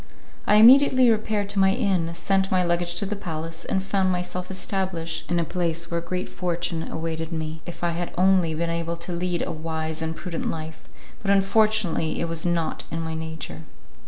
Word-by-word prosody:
I 210 - +5
immediately 255 +2 +7
repaired 215 -2 0
to 200 0 -1
my 190 0 +5
inn, 195 -8 +1
sent 195 +1 +1
my 185 -1 +2
luggage 175 0 0
to 200 - 0
the 205 +2 -2
palace, 165 -3 -5
and 190 - 0
found 190 -1 +1
myself 180 0 -3
established 185 -4 -2
in 175 - +2
a - - +2
place 170 -1 -2
in - - -19
which 170 - -1
a - - -14
great 180 0 -2
fortune 170 -2 -3
awaited 160 0 -3
me, 160 -1 -4
if 175 - -8
I 170 - +2
had 170 +1 -3
only 180 -3 +3
been 165 +1 -1
able 170 0 -2
to 170 +2 -5
lead 175 0 -1
a - - -3
wise 160 0 -3
and 160 0 -2
prudent 175 -1 -4
life, 155 -7 -6 0.3
but 200 - -3
unfortunately 200 -4 +2
it 170 - 0
was 165 +1 -1
not 170 -2 -1
in 165 - -3
my 160 0 -3
nature. 160 - -6
170 Hz, 200 wpm, -25 LUFS, 165-190 Hz, 0.3 s, immediately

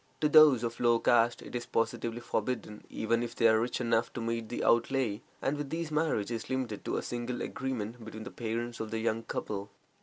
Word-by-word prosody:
To 150 - +4
those 150 -5 +7
of 115 0 -3
low 120 -1 +4
caste 120 0 +3
it - - -11
is 120 -1 -3
positively 115 +1 -1
forbidden, 120 -4 -3
even 115 +1 0
if 120 0 -4
they 115 - +5
are 110 0 +5
rich 120 +1 -1
enough 115 -2 +1
to - - -4
meet 115 -1 -2
the - - -3
outlay, 115 -2 +2 0.2
and 145 +2 0
with 145 -1 -4
these 165 0 -3
marriage 150 -9 0
is 115 0 -4
limited 130 -5 -2
to - - -1
a - - -2
simple 120 0 -3
agreement 120 -3 -4
between 110 0 -8
the 125 - -8
parents 120 +1 -3
of 110 - -4
the 110 - -2
young 110 0 0
couple. 100 -2 -4
115 Hz, 215 wpm, -31 LUFS, 115-125 Hz, 0.2 s, those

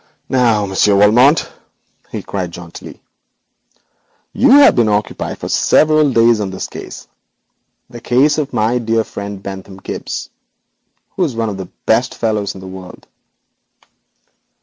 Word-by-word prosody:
'Now, 120 -5 +2
Monsieur 100 +1 +2
Valmont,' 120 +9 +4 0.6
he - - -5
cried 95 -3 -4
jauntily, 85 0 -11 1.3
'you 275 - +3
have 280 +2 +7
been 115 -3 +2
occupied 105 0 -2
for - - -6
several 155 -2 +3
days 115 -1 +4
on 100 -2 -2
this 95 0 -5
case, - - -10 0.8
the 120 -1 -11
case 140 +6 +2
of 145 -2 -3
my 115 +3 0
dear 115 -1 0
friend 100 -2 -8
Bentham 95 0 -8
Gibbes, - - -6 0.8
who 185 - -1
is 145 -9 -2
one 115 -1 -1
of 100 - -5
the 95 -2 -7 0.2
best 115 +3 +1
fellows 105 -3 -2
in 95 - -10
the 95 - -9
world.' 95 -1 -11
110 Hz, 140 wpm, -16 LUFS, 100-125 Hz, 1.3 s, have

